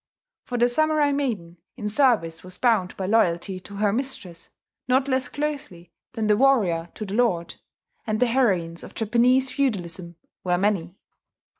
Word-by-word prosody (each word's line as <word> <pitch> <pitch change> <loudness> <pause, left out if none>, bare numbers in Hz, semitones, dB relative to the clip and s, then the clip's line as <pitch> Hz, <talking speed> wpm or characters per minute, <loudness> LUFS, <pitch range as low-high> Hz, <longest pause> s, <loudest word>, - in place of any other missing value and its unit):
For 245 - -3
the 240 0 +4
samurai 305 +3 +2
maiden 220 -12 -2 0.2
in 210 -4 -4
service 210 - +2
was 185 0 -9
bound 220 -7 +1
by 190 - -3
loyalty 185 -3 +1
to 200 +2 -12
her 205 0 +1
mistress 220 -9 -5 0.4
not 260 +2 +2
less 260 -1 0
closely 280 - -5 0.2
than 225 -3 -2
the 210 0 +4
warrior 205 -10 +2
to 215 - -5
the 195 - -6
lord; 200 -8 +1 0.5
and 215 0 0
the 250 - +4
heroines 190 -10 +1
of - - -11
Japanese 245 +4 +2
feudalism 180 - -2 0.3
were 180 -1 +1
many. 190 -3 0
215 Hz, 155 wpm, -24 LUFS, 180-255 Hz, 0.5 s, the